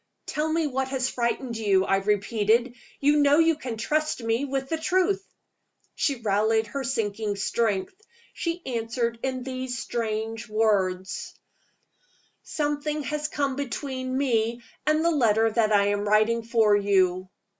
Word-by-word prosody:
"Tell 310 +1 -1
me 325 0 +1
what 265 -2 -1
has 265 -1 -1
frightened 235 0 -2
you?" 195 -3 +2
I 195 - +2
repeated. 210 +4 +1 0.3
"You 290 +1 +4
know 290 0 +5
you 330 0 +4
may 245 -3 -3
trust 300 +3 -1
me 230 +4 0
with 270 -1 -2
the 320 +2 -2
truth." 375 +4 +1 0.7
She 280 - 0
rallied 220 +1 +2
her 275 +5 -4
sinking 220 -4 -2
strength. 205 - -1 0.4
She 340 0 -3
answered 235 -1 -2
in 260 -1 -2
these 255 -1 -4
strange 225 0 -3
words: 195 -4 0 1.1
"Something 295 0 -2
has 300 +1 -2
come 280 -3 -1
between 260 -1 -3
me 235 -3 0 0.2
and 310 +1 +3
the 340 - +4
letter 225 -6 +3
that 220 -1 +2
I 200 -1 +4
am 205 0 -1
writing 215 +2 +3
for 225 -2 +3
you." 185 -2 +2
235 Hz, 145 wpm, -26 LUFS, 215-280 Hz, 1.1 s, know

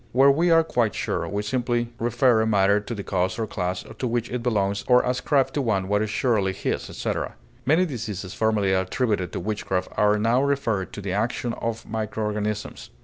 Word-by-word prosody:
Where 135 +3 +6
we 165 +5 +2
are 165 -1 +6
quite 120 -8 0
sure, - - -2
we 100 +1 -2
simply 120 0 -1
refer 120 0 +3
a 110 - +1
matter 100 -1 +4
to 110 +3 -6
the 100 - -5
cause 95 +1 -1
or 115 - -1
class 90 -3 -3
to 130 - -1
which 120 0 -2
it 125 -1 -2
belongs 100 -4 0
or 125 -1 +5
ascribe 130 +2 +1
to 145 - 0
one 100 -7 0
what 105 +1 +1
is 110 - -1
surely 100 -4 +1
his, - - -3
etc. - - -3 0.3
Many 160 +6 +4
diseases 105 - -5
formerly 105 -3 +1
attributed 95 -1 0
to - - -2
witchcraft 95 -1 -2
are 105 0 +4
now 115 +4 +2
referred 135 -9 0
to 105 - -6
the 95 -2 -3
action 115 +3 -1
of 115 -1 -4
micro 110 0 -3
organisms. 105 0 -3
110 Hz, 200 wpm, -24 LUFS, 100-125 Hz, 0.3 s, Where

